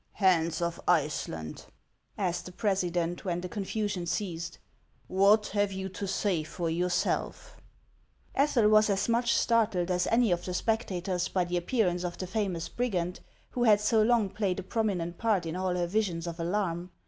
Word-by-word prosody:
" - - -43
Hans 170 -4 +2
of 170 0 -3
Iceland," 140 - -1 0.5
asked 180 -3 -2
the - - -8
president, 180 -4 -1
when 175 -2 -2
the 180 - -4
con 200 +2 -4
fasion 205 -4 -2
ceased, 170 -3 -3 0.3
" - - -37
what 210 +2 +5
have 205 0 +1
you 190 0 -4
to 200 +1 -5
.say 190 -3 0
for 165 +2 -3
yourself? 180 - -1 0.4
" - - -36
Ethel 270 -6 +3
was 215 0 +5
as 195 -1 +1
much 235 +1 +2
startled 210 -6 +2
as 180 0 +1
any 230 -3 +3
of 175 0 0
the 180 - -4
spectators 185 -5 -1
by 185 -2 0
the 175 +1 -1
appearance 180 -2 0
of 175 -1 -4
the 185 - -4
famous 185 -4 -2
brigand, 185 -8 -2 0.3
who 245 -1 0
had 210 -2 +6
so 215 +1 +3
Ion,' 220 -3 +3
played 195 -3 -1
a - - -5
prominent 185 -6 -2
part 210 -6 +1
in 165 +1 -4
all 185 -1 -1
her 175 -1 0
visions 175 -3 -1
of 170 0 -6
alarm. 175 0 -1
185 Hz, 185 wpm, -29 LUFS, 175-210 Hz, 0.5 s, had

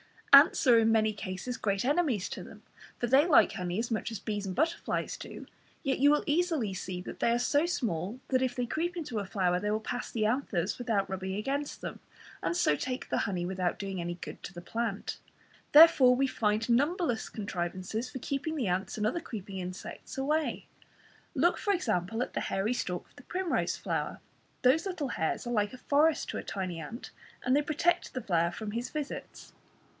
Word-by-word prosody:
Ants 280 +3 +8
are 240 -3 +7
in 225 0 +4
many 220 -1 +3
cases 205 +4 -5
great 200 -2 0
enemies 280 - +1
to - - -6
them, - - -12 0.3
for - - -1
they 270 +7 +5
like 315 - +6
honey 180 -2 -3
as 235 +2 -2
much 225 +1 -1
as 225 - -3
bees 205 0 -3
and 185 - -4
butterflies 325 +3 0
do, - - -9 0.4
yet 270 -3 0
you 285 +2 +6
will 295 0 +3
easily 305 - +1
see 180 -1 -5
that - - -8
they 235 - +3
are 235 - +3
so 285 +6 +2
small 225 - -2
that 255 -1 +2
if 255 -1 0
they 245 - -1
creep 345 +8 -2
into 295 -10 -3
a 200 - -3
flower 185 -2 +1
they 210 - -2
pass 245 +3 -4
the 215 -2 0
anthers 215 -6 0
without 225 -5 0
rubbing 190 0 -3
against 275 +7 -3
them, - - -6 0.4
and 345 - -1
so 150 - +3
take 255 - -4
the - - +1
honey 180 -3 -2
without 185 -1 -1
doing 195 -2 -4
any 175 0 -3
good 175 - -9
to 195 - -8
the 175 - -8
plant. 225 +1 -3 0.5
Therefore 290 -5 +8
we 270 +2 +2
find 215 -3 0
numberless 275 0 +1
contrivances 190 +3 -3
for - - -6
keeping 285 +5 -2
the 260 -9 -1
ants 185 +4 -1
and 210 - 0
other 245 +10 +1
creeping 200 - -7
insects 185 +7 -7
away. 300 +3 0 0.7
Look 340 +7 +3
for 405 - +1
example 225 - 0
at - - -8
the - - -1
hairy 200 +5 0
stalk 190 -8 -3
of - - -29
the 250 - -13
primrose 365 +4 -1
flower; - - -3 0.4
those 305 +9 +4
little 320 -8 -3
hairs 160 -1 -1
are 240 - -2
like 210 -1 +1
a - - -8
forest 300 +4 +2
to - - -3
a - - -4
tiny 185 -4 -4
ant, 220 - -8 0.3
and 255 +2 +3
they 290 - +4
protect 310 +4 0
the 255 - -3
flower 170 -3 +2
from 210 +4 -6
his 235 +3 -3
visits. 300 -2 -6
235 Hz, 200 wpm, -30 LUFS, 195-280 Hz, 0.7 s, Ants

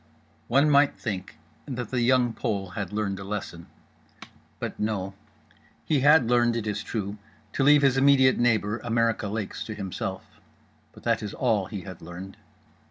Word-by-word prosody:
One 140 +5 +4
might 145 -1 +4
think 100 -4 -5 0.3
that 125 -4 -5
The 125 -2 0
Young 125 -1 +3
Pole 100 -4 -2
had 105 0 -5
learned 105 -2 -2
a - - -6
lesson. 95 -4 -6 0.9
But - - -6
no. 100 -3 -2 0.7
He 150 -3 +2
had 145 -2 +5
learned 120 -1 +3
(it 115 -2 -2
is 105 -1 -2
true) 105 -2 -4 0.3
to - - 0
leave 145 +1 +6
his 135 -1 +4
immediate 135 -1 +5
neighbour, 115 -2 +1
America 115 -2 0
Lakes, 105 0 -4
to 110 - -6
himself; 95 -1 -6 0.5
but - - -16
that - - +1
is 105 - -5
all 110 -7 +1
he 100 -2 -6
had 95 -3 -10
learned. 90 +3 -9
110 Hz, 165 wpm, -26 LUFS, 100-125 Hz, 0.9 s, leave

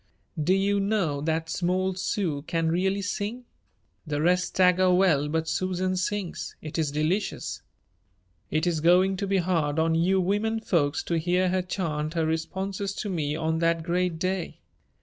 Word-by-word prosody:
Do 180 +5 +3
you 200 +1 +2
know 195 -8 0
that 160 +1 -1
small 185 +2 0
Sue 180 -5 -2
can 165 -1 0
really 190 +3 0
sing? 210 +5 -3 0.6
The 145 -1 -1
rest 180 +3 +3
stagger 185 0 +3
well 170 -6 +3
but 160 +1 -1
Susan 185 +1 -1
sings. 185 0 -3
It 155 +1 -5
is 155 -2 +1
delicious. 155 +8 -2 0.9
It 155 +2 0
is 170 -3 +1
going 180 +4 +4
to 200 - -2
be 195 0 +2
hard 165 -5 0
on 160 0 +2
you 180 +4 +2
women 210 +4 0
folks 160 -9 0
to 170 -1 0
hear 180 +2 +1
her 185 +1 +1
chant 160 -4 -3
her 165 -1 +1
responses 190 +5 -2
to 205 - -3
me 150 -4 -1
on 160 0 -1
that 165 -1 +1
great 175 0 0
day." 185 +1 -3
180 Hz, 165 wpm, -26 LUFS, 160-190 Hz, 0.9 s, going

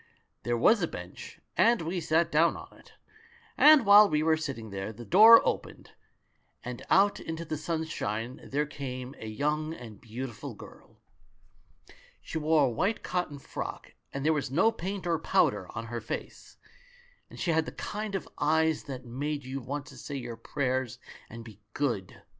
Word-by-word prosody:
"There 120 0 -1
was 215 - +4
a 170 - +1
bench, 90 - -9 0.2
and 230 -5 +4
we 175 +2 -2
sat 165 +1 +1
down 165 +3 +3
on - - -12
it; - - -19 0.6
and 300 -5 +7
while 205 +1 +8
we 150 -1 +1
were 160 0 +4
sitting 130 -9 -5
there, 95 +2 -4
the 120 +2 -10
door 220 - +8
opened - - -4 0.4
— - - -43
and 125 -1 -6
out 200 +1 +4
into 165 +1 -5
the 155 - -3
sunshine 150 -8 -3
there 145 +2 -1
came 130 -3 -6
a 110 - -7
young 150 +7 -1
and 110 -7 -11
beautiful 120 +1 -7
girl. - - -15 1.2
She 160 - -5
wore 155 -1 +3
a - - +1
white 195 - -1
cotton 175 -5 -2
frock, 140 - -7 0.2
and 140 +1 -4
there 160 - +4
was 140 -3 -2
no 170 - +3
paint 190 -1 -5
or 170 -2 +1
powder - - +2
on 115 - -4
her 120 0 -5
face, 110 - -7 0.7
and - - -12
she 175 - 0
had 160 -1 +1
the - - -4
kind 210 -1 -5
of 195 - -4
eyes 160 +1 +2
that 130 -2 -7
make 145 +4 -3
you 135 +1 -4
want 140 +3 -5
to 135 - -13
say 140 +4 -7
your 120 -3 -5
prayers 130 +1 -2 0.3
and 115 0 -9
be 110 -3 -13 0.2
good. 115 -10 -2
145 Hz, 175 wpm, -29 LUFS, 120-165 Hz, 1.2 s, while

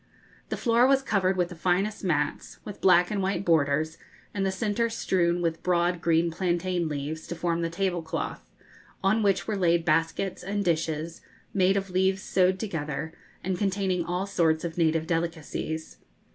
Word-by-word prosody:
The - - -2
floor 235 +1 +4
was 270 0 +3
covered 190 -5 +1
with 175 -1 +1
the 175 - -8
finest 190 +6 0
mats, 150 -6 -1
with 205 - -8
black 180 -1 +5
and 205 -2 0
white 195 +1 -1
borders, 155 -1 +2 0.3
and 200 - -1
the 195 - +1
centre 220 +3 0
strewn 175 -6 0
with 165 -1 -1
broad 175 -1 +1
green 165 0 +2
plantain 175 0 -1
leaves, 150 +2 -4
to 175 - -4
form 170 0 -1
the 165 - -1
tablecloth, 175 -2 -2 0.6
on 205 +4 +3
which 200 -2 +2
were 215 - -1
laid 170 -3 +2
baskets 165 +4 0
and 200 +2 -2
dishes, 160 -1 -1 0.3
made 190 0 +3
of 195 -1 -3
leaves 190 +1 +1
sewed 185 0 +2
together, 160 -5 -4 0.3
and 185 0 -2
containing 190 -3 0
all 180 +3 -2
sorts 165 -5 +1
of 165 -1 -4
native 160 -1 +2
delicacies. 165 -1 -3
175 Hz, 165 wpm, -27 LUFS, 165-195 Hz, 0.6 s, black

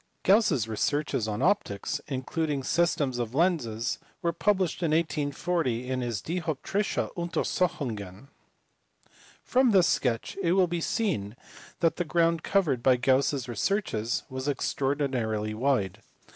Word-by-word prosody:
Gauss 215 +3 +5
s 115 -4 0
researches 120 +1 -1
on 105 +4 -2
optics, 155 - 0
including 140 +2 -2
systems 145 -6 +1
of 120 +1 -3
lenses, 125 -9 0 0.2
were 170 0 +1
published 185 -1 +1
in 165 - +1
1840 150 -4 0
in 130 0 -1
his 120 -5 -3
Dioptrische 170 +4 -2
Untersuchungen. 140 - -2 1.1
From 255 0 +3
this 190 -5 +5
sketch 125 +7 0
it 175 -2 +2
will 190 -1 +5
be 175 -1 -3
seen 160 - -1 0.5
that 165 -1 +2
the 175 - 0
ground 165 0 +2
covered 165 -12 +1
by 130 +1 +5
Gauss 130 +2 +3
s 135 -4 -4
researches 120 - -1
was 130 +1 -5
extraordinarily 130 -7 -1
wide. 110 -5 0
140 Hz, 130 wpm, -28 LUFS, 120-170 Hz, 1.1 s, Gauss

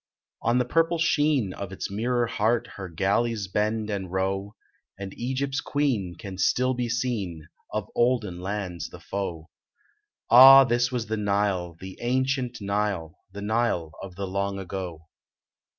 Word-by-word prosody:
On 120 +2 +2
the 125 - +2
purple 165 +6 +2
sheen 145 - +2
of 100 -2 -6
its 95 - -5
mirror 120 +4 0
heart 115 +1 0
Her 95 -2 -7
galleys 100 +4 0
bend 105 +2 -1
and 95 -3 -4
row, 95 +2 -2 0.4
And 95 -1 -7
Egypt 130 +3 -2
s 145 - +1
queen 125 -14 -1
can 95 0 -8
still 130 +7 +2
be 120 -1 -2
seen, 105 -10 -2 0.2
Of - - -3
olden 115 -7 +1
lands 95 -2 -4
the - - -11
foe. 85 -5 -5 0.8
Ah! 135 +3 +10
this 120 0 +1
was 120 -3 -2
the 110 0 -2
Nile, 100 -4 0
the 95 0 -9
ancient 130 0 0
Nile, 100 -5 -2
The 100 +1 -7
Nile 105 -7 0
of 95 -2 -9
the 100 +1 -3
long 100 +1 -2
ago. 90 -4 -6
105 Hz, 150 wpm, -26 LUFS, 95-125 Hz, 0.8 s, Ah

